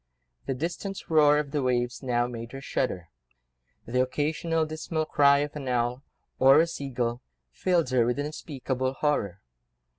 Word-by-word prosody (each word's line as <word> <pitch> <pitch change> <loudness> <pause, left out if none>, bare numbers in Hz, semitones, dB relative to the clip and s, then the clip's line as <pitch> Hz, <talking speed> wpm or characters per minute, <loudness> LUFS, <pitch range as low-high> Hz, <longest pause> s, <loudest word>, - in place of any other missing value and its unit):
The 135 - -1
distant 175 +6 -5
roar 150 -2 +6
of 150 -2 -2
the 145 - 0
waves 120 -2 0
now 120 -2 +1
made 115 0 -7
her 135 - -6
shudder; 95 -10 -2 0.8
the 125 +2 +1
occasional 155 +5 0
dismal 155 0 -3
cry 140 -2 +4
of 150 - -12
an 140 -3 -6
owl, 125 +1 0 0.4
or 135 +3 +7
a 165 - +5
sea 140 -4 -6
gull, 120 -1 -2 0.3
filled 170 - +1
her 125 -2 +4
with 120 +2 0
unspeakable 135 -3 -3
horror. 100 - -1
135 Hz, 155 wpm, -27 LUFS, 125-150 Hz, 0.8 s, or